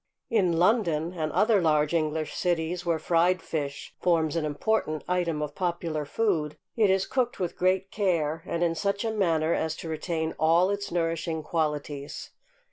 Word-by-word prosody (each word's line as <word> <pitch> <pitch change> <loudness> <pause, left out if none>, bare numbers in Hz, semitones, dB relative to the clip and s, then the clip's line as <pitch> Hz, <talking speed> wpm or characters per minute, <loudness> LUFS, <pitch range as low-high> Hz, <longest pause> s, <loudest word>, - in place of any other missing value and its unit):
In 185 -7 +2
London, 175 -4 +2
and 155 -3 -2
other 215 -2 +3
large 150 -1 +2
English 155 -1 0
cities, 175 0 -1
where 170 -2 +1
fried 175 +3 +2
fish 140 -5 -4
forms 165 -3 +2
an 165 -2 0
important 155 +1 -1
item 170 -4 0
of 150 - -5
popular 170 -4 -2
food, 155 -5 0 0.2
it 215 -4 +4
is 190 0 +2
cooked 255 -2 -1
with 180 -3 -2
great 185 +1 +1
care, 165 -6 0
and 170 +1 -1
in 170 -1 +2
such 200 +5 -1
a 225 - 0
manner 165 -6 +2
as 160 -1 -1
to 165 - -7
retain 160 0 -2
all 170 +4 +4
its 200 0 -3
nourishing 165 -2 -1
qualities. 150 -3 -3
170 Hz, 165 wpm, -27 LUFS, 155-185 Hz, 0.2 s, it